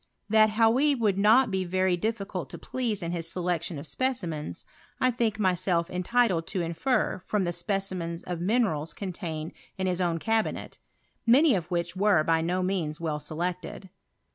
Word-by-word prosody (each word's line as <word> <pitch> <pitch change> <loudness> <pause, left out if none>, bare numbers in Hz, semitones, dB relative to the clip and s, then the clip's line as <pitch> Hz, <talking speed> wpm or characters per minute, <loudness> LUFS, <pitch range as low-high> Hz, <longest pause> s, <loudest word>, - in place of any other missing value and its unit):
That 220 0 +6
;Hany 235 +7 +3
would 210 -6 +1
not 225 +5 +5
be 190 -1 0
very 185 0 +1
difficult 195 -2 -3
to - - -8
please 225 -7 -3
in 170 - -2
his 170 -2 -3
•election 175 -2 -1
of 140 - -7
specimens, 165 - -3 0.3
1 255 - +2
think 225 -3 0
myself 180 -3 +1
entitled 180 -2 +1
to 190 - -2
iofer 180 +5 0
from 210 -2 +1
the 175 - 0
specimens 185 -4 -3
of 175 -2 -4
minerals 190 -7 0
contained 170 -5 -5 0.3
in 190 - -1
Ilia 185 0 0
own 170 -2 0
cabinet, 225 +5 -1 0.5
many 275 +5 +6
of 175 -4 -2
which 175 0 -2
were 190 -4 +3
by 165 0 +2
no 180 +3 0
means 175 -5 -1
■•ell 155 -3 -3
selected. 175 +4 -4
185 Hz, 165 wpm, -27 LUFS, 170-215 Hz, 0.5 s, That